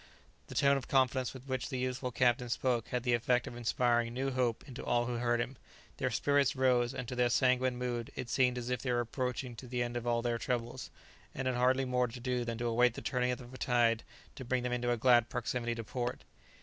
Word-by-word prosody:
The - - -9
tone 140 0 +4
of 135 - -6
confidence 130 -1 +2
with 130 -1 -11
which 130 -2 -2
the 130 - -3
youthful 125 0 -2
captain 125 0 +2
spoke 120 -1 0
had 125 -1 -2
the 125 -1 +2
effect 120 +1 +2
of - - -7
inspiring 120 0 +1
new 135 +1 -1
hope 125 -1 -1
into 130 -2 -8
all 120 0 +1
who 120 0 -2
heard 120 0 +1
him; 125 +2 -3 0.4
their - - 0
spirits 140 -2 +2
rose, 125 -2 +3
and 125 - -4
to 125 - -4
their 125 0 +3
sanguine 130 0 +2
mood 120 -2 -3
it 130 - -4
seemed 125 0 +2
as 125 0 -4
if 125 - -1
they 125 - -1
were 120 - +2
approaching 125 0 -3
to 125 - -9
the 120 0 -1
end 120 0 -4
of 120 0 -3
all 120 -1 +1
their 120 -1 0
troubles, 120 +1 -3 0.5
and 135 0 -2
had 130 - +1
hardly 130 +2 +3
more 125 -1 +1
to 120 +2 -9
do 125 0 -1
than 115 -1 -3
to 120 - -3
await 120 +1 +3
the - - -6
turning 125 -2 0
of 125 0 -5
a - - -8
tide 115 -2 +2 0.3
to 130 - -8
bring 125 0 -1
them 125 0 -1
into 120 0 -1
a 120 - +1
glad 120 0 +4
proximity 120 0 -2
to 115 - -5
port. 125 +2 -4
125 Hz, 240 wpm, -32 LUFS, 120-130 Hz, 0.5 s, tone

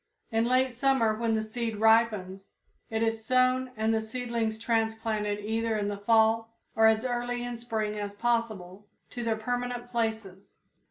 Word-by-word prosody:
In 225 +1 +2
late 255 +1 +2
summer 250 -3 +2
when 225 0 0
the 220 - 0
seed 225 0 -3
ripens, 210 -3 +2 0.4
it 220 0 -1
is 225 0 -1
sown 255 +2 +2
and 220 +1 +1
the 220 - +1
seedlings 230 -1 -3
transplanted 225 -2 -1
either 225 0 0
in 205 -1 -1
the 205 - -4
fall 225 +2 +2 0.2
or 220 0 +6
as 220 +2 +3
early 245 0 -2
in 245 -1 -5
spring 220 -3 -3
as 205 0 -5
possible 210 -4 -2 0.2
to 240 - -5
their 225 -1 +1
permanent 245 +1 -3
places. 220 -5 -4
225 Hz, 160 wpm, -28 LUFS, 220-240 Hz, 0.4 s, or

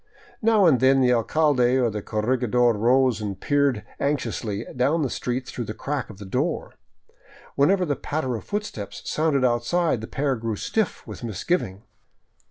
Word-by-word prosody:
Now 220 -3 +4
and 145 -7 +5
then 135 +2 +4
the 125 -1 +4
alcalde 130 +1 +2
or 120 -3 +2
the 105 0 -4
corregidor 120 +2 +1
rose 120 +1 +2
and 100 -2 -4
peered 140 -6 +1
anxiously 120 -7 -2
down 140 +6 +2
the 130 - -2
street 125 +1 -3
through 120 - -5
the 110 - -6
crack 140 +2 -3
of 105 - -11
the 100 - -9
door. 95 - -2 0.8
Whenever 180 +7 +3
the 145 -3 0
patter 145 -5 -3
of 110 - -6
footsteps 205 - -5
sounded 150 -4 +1
out 120 -1 +1
side, 170 -5 +1
the 110 - -6
pair 140 -1 -1
grew 115 -1 -3
stiff 215 - -2
with - - -9
misgiving. 110 - -2
125 Hz, 170 wpm, -24 LUFS, 110-145 Hz, 0.8 s, and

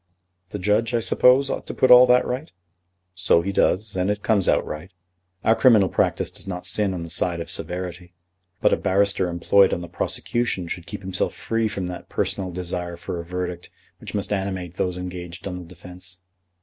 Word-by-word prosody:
"The 105 - -5
judge, 105 +5 +1
I - - +3
suppose, 130 +4 +4
ought - - -4
to - - -5
put 130 - +3
all 125 0 +9
that 125 0 +4
right?" 130 +5 -4 0.6
"So 90 -2 +3
he 100 - -2
does; 105 +2 +1
and 90 +1 0
it 105 0 -2
comes 105 -5 +2
right. 75 +4 -1 0.5
Our 110 - +4
criminal 110 -8 +5
practice - - 0
does - - -10
not 90 -2 -5
sin 100 -3 0
on 85 - -4
the 85 - -8
side 85 -1 0
of 85 - -4
severity. 90 0 -5 0.5
But - - +4
a - - +3
barrister 100 -1 +1
employed 95 +3 +3
on 85 - -6
the 85 - -7
prosecution 95 +2 -1
should 85 0 -6
keep - - -7
himself 95 -1 -1
free 115 -1 -1
from 100 -3 -4
that 90 0 -7
personal 95 -2 -2
desire 90 -1 -4
for 85 0 -6
a - - -5
verdict 90 0 -5 0.3
which - - -8
must 100 0 -1
animate 95 -3 -3
those 90 -1 -2
engaged 90 0 -7
on 90 -1 -5
the 90 - -10
defence." 90 +1 -12
90 Hz, 195 wpm, -23 LUFS, 90-105 Hz, 0.6 s, all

